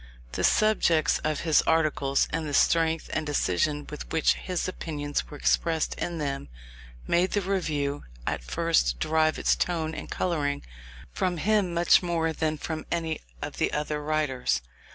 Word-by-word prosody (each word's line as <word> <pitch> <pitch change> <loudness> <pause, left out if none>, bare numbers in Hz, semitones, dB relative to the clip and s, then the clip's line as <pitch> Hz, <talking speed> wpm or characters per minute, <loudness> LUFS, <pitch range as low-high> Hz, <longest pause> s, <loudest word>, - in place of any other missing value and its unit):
The 65 - -3
subjects 170 -8 +3
of 155 -1 -1
his 160 -3 +4
articles, 155 -4 +2
and 160 -1 -2
the 145 - -1
strength 165 -1 +3
and 155 - 0
decision 145 - 0
with 150 - -7
which 160 - +3
his 180 -1 -3
opinions 145 - -3
were - - -8
expressed 60 - +1
in 170 -1 -2
them, 140 - -3 0.6
made 175 +2 +2
the 205 - +2
Review 155 -7 -1 0.2
at - - -2
first - - +1
derive 155 0 +2
its - - +2
tone 160 -3 -1
and - - -7
colouring 145 -5 -1 0.5
from 180 - -1
him 205 +1 +2
much 170 0 +5
more 165 -2 0
than 155 0 -1
from 155 +1 -5
any 165 -2 -2 0.2
of - - -6
the - - +1
other 150 0 -2
writers. 145 - 0
155 Hz, 155 wpm, -27 LUFS, 145-170 Hz, 0.6 s, much